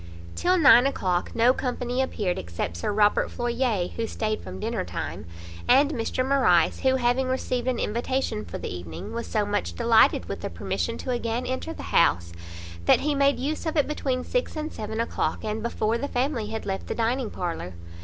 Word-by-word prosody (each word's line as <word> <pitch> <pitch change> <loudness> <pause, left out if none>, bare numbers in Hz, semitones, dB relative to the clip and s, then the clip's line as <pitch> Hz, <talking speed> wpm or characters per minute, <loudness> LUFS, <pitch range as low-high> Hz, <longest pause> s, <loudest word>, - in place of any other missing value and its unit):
Till 365 +1 +2
nine 265 -5 +7
o'clock 180 -9 -1
no 235 +2 +5
company 250 -1 -2
appeared, 205 -8 -1
except 85 0 -4
Sir 85 - -1
Robert 205 0 +3
Floyer, 240 -5 0
who 230 -1 -3
stayed 215 -1 -2
from 95 0 -8
dinner - - -2
time, - - -5 0.4
and 285 +2 +5
Mr 255 0 -1
Morrice, 265 -11 +3
who 260 0 +3
having 250 +1 +1
received 255 -1 -1
an 255 -2 +1
invitation 235 -1 -1
for - - -6
the - - -5
evening, 85 -1 -7
was 235 0 -4
so 210 -2 0
much 145 - -1
delighted - - +4
with - - -5
the - - -3
permission 85 0 -3
to 255 - -4
again 240 0 -1
enter 260 +5 -3
the - - -8
house, 85 - +3 0.5
that - - +5
he 300 0 +1
made 280 0 +3
use 305 +5 -3
of 320 - -1
it 290 - +3
between 265 -4 -1
six - - -2
and 310 0 -4
seven 220 +1 -5
o'clock, 230 - -1
and 215 0 -2
before 230 0 -1
the 285 - -2
family 250 -4 -1
had 220 +1 -5
left 195 -1 -3
the - - -3
dining 235 +1 0
parlour. 170 - -4
235 Hz, 195 wpm, -26 LUFS, 205-265 Hz, 0.5 s, nine